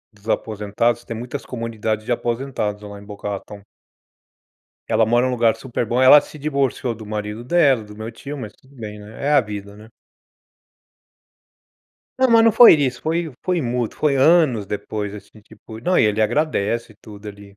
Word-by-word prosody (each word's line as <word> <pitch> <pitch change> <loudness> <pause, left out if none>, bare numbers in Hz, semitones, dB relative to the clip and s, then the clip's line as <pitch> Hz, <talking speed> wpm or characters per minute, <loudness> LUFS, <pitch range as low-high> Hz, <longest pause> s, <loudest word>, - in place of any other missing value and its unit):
dos 105 +2 -13
aposentados, 110 +3 -1
tem 115 - -6
muitas 125 +4 -6
comunidades 110 -3 -4
de - - -3
aposentados 120 -4 -2
lá 100 -1 -9
em - - -14
Boca 105 0 -7
Raton. 100 0 -7 1.3
Ela 110 - +3
mora 120 +3 +2
num 130 - -1
lugar 115 -2 +2
super 120 -2 -4
bom, 120 +3 +1
ela 130 +3 +9
se 150 - -13
divorciou 135 -4 -1
do 110 -1 -11
marido 105 +2 -5
dela, 135 -6 +3
do 105 0 -13
meu 110 +1 -6
tio, 140 +5 -8
mas 110 -6 -7
tudo 135 +1 -24
bem, 105 -4 -8
né, 105 +5 -10
é 145 - +2
a 145 - +6
vida, 100 -3 -8
né. 110 +2 -15 2.3
Ah, 260 0 +4
mas 230 -1 +6
não 230 - +5
foi 240 -3 +9
isso, 135 -5 -1
foi 165 -1 -2
foi 180 -2 0
mútuo, 120 -2 -3
foi 145 -2 +2
anos 135 - +3
depois, 105 0 -4
assim, 105 +1 -13
tipo, 110 +1 -13
não 180 +9 +1
e - - +4
ele 105 0 +1
agradece 115 -2 0
e - - -28
tudo, 105 -1 -12
ali. 100 -1 -13
115 Hz, 185 wpm, -21 LUFS, 105-135 Hz, 2.3 s, ela